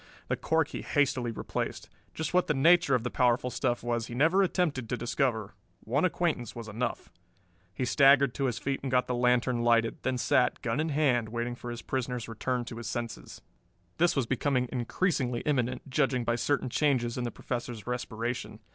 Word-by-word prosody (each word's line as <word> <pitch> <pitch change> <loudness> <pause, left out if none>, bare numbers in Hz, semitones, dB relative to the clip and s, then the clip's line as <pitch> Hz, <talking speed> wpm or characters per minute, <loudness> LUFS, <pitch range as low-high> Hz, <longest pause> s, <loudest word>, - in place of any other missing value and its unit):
The - - +2
cork 160 -2 +1
he - - -5
hastily 130 -4 +1
replaced. 115 - -4 0.3
Just 160 - -3
what 180 0 +3
the 150 - +1
nature 165 0 +5
of 120 - 0
the 125 - -3
powerful 125 0 +2
stuff 120 -1 -1
was 120 -1 -1
he 120 - -7
never 165 +9 +4
attempted 160 - 0
to 125 - -1
discover. 115 -4 -1 0.3
One 140 +9 +1
acquaintance 165 - -1
was 115 -2 -7
enough. 115 +3 -4 0.6
He 125 - -2
staggered 140 0 +5
to 140 - -1
his 120 -4 -1
feet 135 +2 -2
and 135 - -3
got 125 0 +2
the 125 - -2
lantern 125 0 +2
lighted, 115 -1 +2
then 130 -1 -1
sat, 125 0 +2
gun 115 +4 -1
in 160 +1 0
hand, 135 -7 +2
waiting 120 +1 -3
for 120 0 -8
his 120 0 -6
prisoner's 125 -2 -3
return 120 +2 -2
to 115 - -7
his 120 -1 -6
senses. 120 0 -5 0.6
This 175 +1 +3
was 135 -4 +1
becoming 130 +1 0
increasingly 125 -1 -1
imminent, 130 -3 -1
judging 125 -1 +1
by 120 0 +1
certain 135 +1 0
changes 125 -6 +1
in 125 - -2
the 120 - -1
Professor's 120 -2 -5
respiration. 120 -1 -4
125 Hz, 190 wpm, -29 LUFS, 120-140 Hz, 0.6 s, nature